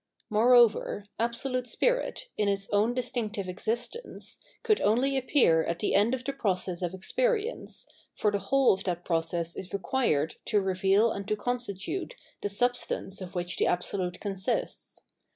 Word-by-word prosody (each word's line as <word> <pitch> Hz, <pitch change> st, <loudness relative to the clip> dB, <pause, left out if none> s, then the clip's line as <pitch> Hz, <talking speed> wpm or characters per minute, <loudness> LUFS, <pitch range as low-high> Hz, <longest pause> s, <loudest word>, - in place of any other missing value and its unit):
Moreover, 225 Hz, -2 st, +4 dB
Absolute 250 Hz, +2 st, -1 dB
Spirit, -, -, 0 dB
in 210 Hz, -, +1 dB
its 195 Hz, 0 st, -1 dB
own 215 Hz, +4 st, +2 dB
distinctive 230 Hz, -5 st, -2 dB
existence, 235 Hz, -, -4 dB, 0.2 s
could 435 Hz, -3 st, +3 dB
only 250 Hz, +6 st, +2 dB
appear 255 Hz, -, +4 dB
at 170 Hz, -, -2 dB
the 205 Hz, -, 0 dB
end 215 Hz, +5 st, +4 dB
of 255 Hz, -, -7 dB
the 275 Hz, +2 st, -2 dB
process 185 Hz, -7 st, -1 dB
of 175 Hz, +1 st, -2 dB
experience, 470 Hz, -, -1 dB, 0.3 s
for 210 Hz, -, +1 dB
the 200 Hz, -, 0 dB
whole 270 Hz, +4 st, +4 dB
of 190 Hz, -, -3 dB
that 175 Hz, -2 st, -2 dB
process 165 Hz, 0 st, -1 dB
is 190 Hz, -, -7 dB
required 195 Hz, -, 0 dB
to 210 Hz, -, +3 dB
reveal 195 Hz, +3 st, +3 dB
and 200 Hz, -1 st, -5 dB
to 215 Hz, -, +1 dB
constitute 245 Hz, -, -3 dB, 0.3 s
the 205 Hz, -, -1 dB
substance 245 Hz, -3 st, -1 dB
of 185 Hz, -1 st, -8 dB
which 175 Hz, 0 st, -2 dB
the -, -, +2 dB
Absolute 180 Hz, 0 st, -1 dB
consists. 200 Hz, -, -3 dB
210 Hz, 150 wpm, -29 LUFS, 190-250 Hz, 0.3 s, Moreover